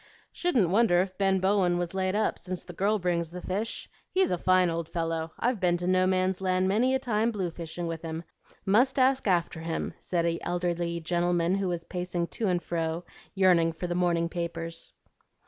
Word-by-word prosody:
"Shouldn't 255 - +1
wonder 200 -4 +4
if 185 -1 -8
Ben 195 -1 +3
Bowen 190 -2 +2
was 175 0 -3
laid 190 0 0
up, 215 - 0
since 185 -1 -5
the 175 - -10
girl 205 +5 +1
brings 175 -3 -1
the 180 +2 -7
fish. 200 +5 -3 0.2
He's 380 0 +2
a 180 - +1
fine 185 0 +4
old 165 -1 -3
fellow. 165 -1 -2
I've 240 -2 0
been 175 -2 +2
to 175 - -4
No 185 0 +3
Man's 185 0 +1
Land 185 0 +1
many 240 +7 +2
a - - +4
time 225 -3 0
blue 190 -6 -2
fishing 170 +1 -6
with 165 -1 -4
him; 165 0 -5 0.4
must 245 +8 +3
ask 260 -1 +3
after 175 -3 +1
him," 165 0 -3
said 170 -2 -1
an 170 0 0
elderly 175 -1 -1
gentleman 175 +1 +1
who 195 -1 0
was 175 -2 -2
pacing 175 -1 -3
to 220 - -2
and 180 -2 0
fro 165 0 -2 0.3
yearning 175 -4 +4
for 165 - -5
the 175 - -1
morning 175 -1 +1
papers. 165 -1 -5
180 Hz, 200 wpm, -28 LUFS, 170-195 Hz, 0.4 s, wonder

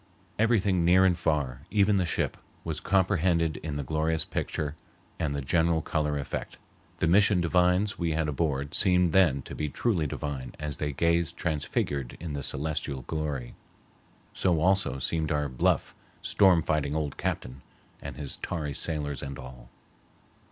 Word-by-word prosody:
Everything 100 -6 +3
near 90 +2 +5
and 90 -2 +4
far, 75 -6 -1
even 100 0 +3
the 90 -2 +1
ship, - - -1 0.3
was 80 -2 -3
comprehended 90 -4 +2
in 75 -2 -5
the 70 - -2
glorious 80 +3 0
picture 75 0 -3 0.4
and 75 -4 -1
the 70 - -3
general 80 +2 +2
color 75 -1 -1
effect. 70 - -5 0.4
The - - +1
mission 100 +2 +5
divines 90 +3 +2
we 85 -2 0
had 80 0 0
aboard 70 -2 -1
seemed 90 -4 +3
then 80 -8 +4
to - - -9
be 75 -1 -2
truly 90 -4 0
divine 70 -2 -5
as 75 -2 -3
they 75 -1 -2
gazed 85 +2 +1
transfigured 70 -4 -2
in 80 -2 -5
the 70 - -3
celestial 70 -1 -3
glory. 75 -4 -3 0.8
So 90 -4 +1
also 90 -6 +2
seemed 80 +4 -1
our 75 -1 +1
bluff, 65 -2 0 0.3
storm 95 -5 +4
fighting 75 -2 0
old 75 -3 -2
captain, 65 +2 -3 0.4
and - - -7
his 70 -2 -4
tarry 75 -4 -3
sailors 75 -3 -2
and 70 -2 -6
all. 65 -1 -11
80 Hz, 155 wpm, -28 LUFS, 70-90 Hz, 0.8 s, near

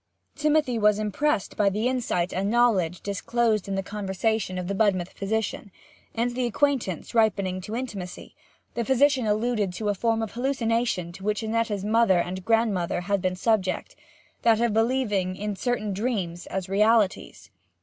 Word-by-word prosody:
Timothy 300 -5 +1
was 210 -1 +4
impressed 215 +3 -1
by 205 -2 +3
the 210 +5 -1
insight 230 -9 -1
and 195 +2 -1
knowledge 205 -8 +2
disclosed 215 +1 0
in 195 - -2
the 195 - -1
conversation 200 0 -2
of 180 -1 -4
the 200 - -1
Budmouth 190 -3 +1
physician, 210 0 -3 0.5
and 240 +1 0
the 250 0 0
acquaintance 240 - -1
ripening 200 -5 +1
to 210 +4 -6
intimacy, 210 -8 -6 0.4
the 235 - -1
physician 265 -1 +3
alluded 215 -2 0
to 210 +3 -2
a - - +2
form 225 +2 0
of 220 - -5
hallucination 230 -7 -1
to 190 +2 -12
which 210 +2 -1
Annetta's 220 -3 -1
mother 220 -3 +4
and 180 +2 -2
grandmother 210 -6 +1
had 200 +1 -1
been 185 -1 0
subject 190 -1 0 0.5
that 225 -2 +4
of 235 -2 +1
believing 220 -5 +1
in 210 +1 -3
certain 215 -2 -1
dreams 190 -6 -3
as 190 -1 -4
realities. 210 - +1
210 Hz, 160 wpm, -25 LUFS, 190-235 Hz, 0.5 s, was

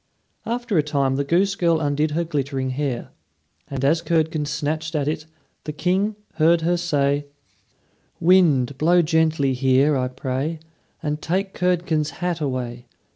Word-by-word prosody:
After 235 -6 0
a - - +6
time 140 -3 0
the 140 - 0
goose 180 +7 +2
girl 170 -4 +2
undid 150 0 0
her 165 +3 -1
glittering 140 -4 -2
hair; 130 -2 -3 0.6
and 135 -1 -3
as 160 +4 +3
Curdken 160 -2 0
snatched 155 +3 -3
at 145 -2 0
it, 155 0 -3 0.4
the 150 - -3
King 185 +7 0 0.2
heard 165 +1 +4
her 175 +2 +2
say: 145 -4 0 0.9
"Wind, 150 -7 +3
blow 175 +3 +4
gently 160 -4 +2
here, 135 +3 +3
I 130 -1 0
pray, 130 +5 -3 0.5
And 150 0 -2
take 190 +3 -1
Curdken's 170 -4 0
hat 175 -2 -2
away. 125 -3 -3
155 Hz, 145 wpm, -22 LUFS, 140-170 Hz, 0.9 s, a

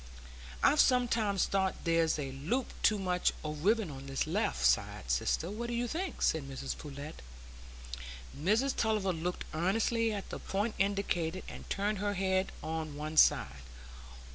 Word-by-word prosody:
"I've 300 - +5
sometimes 230 -6 +3
thought 190 -1 +1
there's 165 -2 +2
a 140 -3 -3
loop 170 - -2
too 215 - +4
much 180 -2 +1
o' 150 -1 -3
ribbon 195 +4 +1
on 135 0 -8
this 135 0 -1
left 60 +1 0
side, 60 0 +2
sister; 155 - 0
what 235 +3 -4
do 240 - -2
you 240 +1 0
think?" 360 +9 -3
said 150 -4 +1
Mrs 135 0 -4
Pullet. 145 - -8 1.1
Mrs 220 - +2
Tulliver 215 -4 +1
looked 175 +2 -3
earnestly 225 +7 +1
at 200 -2 -5
the - - -5
point 205 +3 -1
indicated, 190 -3 0
and - - -9
turned 205 0 0
her 205 0 -1
head 190 0 +1
on 160 -2 -3
one 155 +1 -5
side. 65 - +4
190 Hz, 155 wpm, -32 LUFS, 155-215 Hz, 1.1 s, I've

